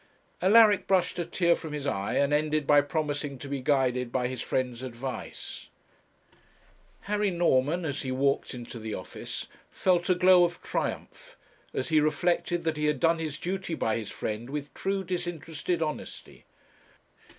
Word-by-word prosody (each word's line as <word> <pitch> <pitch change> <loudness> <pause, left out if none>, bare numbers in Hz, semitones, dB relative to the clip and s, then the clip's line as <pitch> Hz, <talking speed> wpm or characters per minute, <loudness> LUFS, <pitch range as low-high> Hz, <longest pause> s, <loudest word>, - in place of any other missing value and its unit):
Alaric 210 +1 +6
brushed 185 -2 +2
a 170 - -1
tear 170 -1 +3
from 160 -3 -7
his 145 -2 -4
eye, 100 -7 -1
and 140 +1 +2
ended 155 0 +1
by 145 0 +6
promising 145 -1 -2
to 140 - -8
be 140 -1 -3
guided 125 -3 +1
by 125 -1 0
his 130 -1 -4
friend's 125 -2 -2
advice. 125 -1 -6 1.3
Harry 210 0 0
Norman, 170 -1 +2
as 140 -2 -2
he 130 - -3
walked 135 0 0
into 120 -1 -8
the 110 -1 -4
office, 90 - -6 0.2
felt 180 -1 +1
a 185 - +5
glow 180 0 +6
of 175 0 0
triumph - - -4 0.3
as - - -2
he 155 -1 +5
reflected 175 +2 +1
that 160 -2 -1
he 150 0 +1
had 150 -3 +1
done 165 +3 +3
his 155 -3 -3
duty 180 -1 -3
by 110 -6 0
his 110 -3 -4
friend 110 +3 -4
with 145 0 -5
true 195 0 -1
disinterested 175 -2 -2
honesty. 155 -1 -7
150 Hz, 160 wpm, -28 LUFS, 130-175 Hz, 1.3 s, Alaric